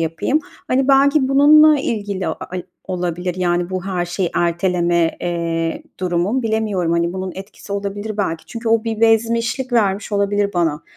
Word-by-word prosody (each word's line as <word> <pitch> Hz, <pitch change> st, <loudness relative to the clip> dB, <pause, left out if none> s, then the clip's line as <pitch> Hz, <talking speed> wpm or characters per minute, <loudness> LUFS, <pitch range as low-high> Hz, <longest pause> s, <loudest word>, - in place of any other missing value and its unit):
yapayım. 165 Hz, -, 0 dB, 0.3 s
Hani, 265 Hz, +1 st, +1 dB
belki 275 Hz, 0 st, +4 dB
bununla 300 Hz, +2 st, +6 dB
ilgili 205 Hz, -6 st, -3 dB
a -, -, -1 dB
ay 180 Hz, -1 st, -6 dB, 0.2 s
olabilir, 180 Hz, -1 st, -3 dB
yani, 175 Hz, 0 st, 0 dB
bu 185 Hz, 0 st, -3 dB
her 180 Hz, -2 st, -1 dB
şeyi 175 Hz, 0 st, -2 dB
erteleme, 175 Hz, -1 st, +1 dB
eee, 165 Hz, -1 st, -2 dB, 0.2 s
durumum. 185 Hz, +7 st, 0 dB
Bilemiyorum, 215 Hz, -6 st, 0 dB
hani, 170 Hz, +1 st, 0 dB
bunun 185 Hz, -1 st, -4 dB
etkisi 195 Hz, +1 st, -9 dB
olabilir 205 Hz, +1 st, -4 dB
belki. 165 Hz, -6 st, -2 dB
Çünkü 230 Hz, -1 st, -5 dB
o 225 Hz, 0 st, +2 dB
bir 225 Hz, -1 st, -3 dB
bezmişlik 230 Hz, +3 st, +1 dB
vermiş 205 Hz, -3 st, +1 dB
olabilir 200 Hz, 0 st, +1 dB
bana. 165 Hz, -3 st, 0 dB
195 Hz, 155 wpm, -19 LUFS, 175-225 Hz, 0.3 s, bununla